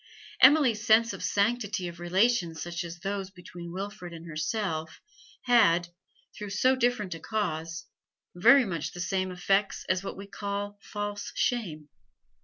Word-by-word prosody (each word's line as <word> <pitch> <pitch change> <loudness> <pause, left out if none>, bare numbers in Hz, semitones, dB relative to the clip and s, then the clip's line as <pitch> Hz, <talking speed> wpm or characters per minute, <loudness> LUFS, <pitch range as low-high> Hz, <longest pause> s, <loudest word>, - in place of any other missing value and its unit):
Emily's 260 -6 +6
sense 230 0 +4
of - - -7
the - - -2
sanctity 205 -2 0
of 170 0 -9
relations 175 -1 +1
such 170 +2 -4
as 170 0 -8
those 195 -1 -3
between 175 -2 -10
Wilfrid 185 -2 -6
and 165 0 -9
herself 160 0 -3 0.4
had, 175 -9 +4 0.5
through 210 -1 -6
so 255 +7 +3
different 240 -7 0
a 165 - -8
cause, 165 -4 -3 0.5
very 235 +9 +6
much 170 -6 -4
the 175 - -9
same 185 +1 -1
effects 195 +2 0
as 185 0 0
what 195 - -6
we 195 - -8
call 205 0 -5
false 205 0 -5
shame. 175 - -1
195 Hz, 150 wpm, -28 LUFS, 175-215 Hz, 0.5 s, Emily's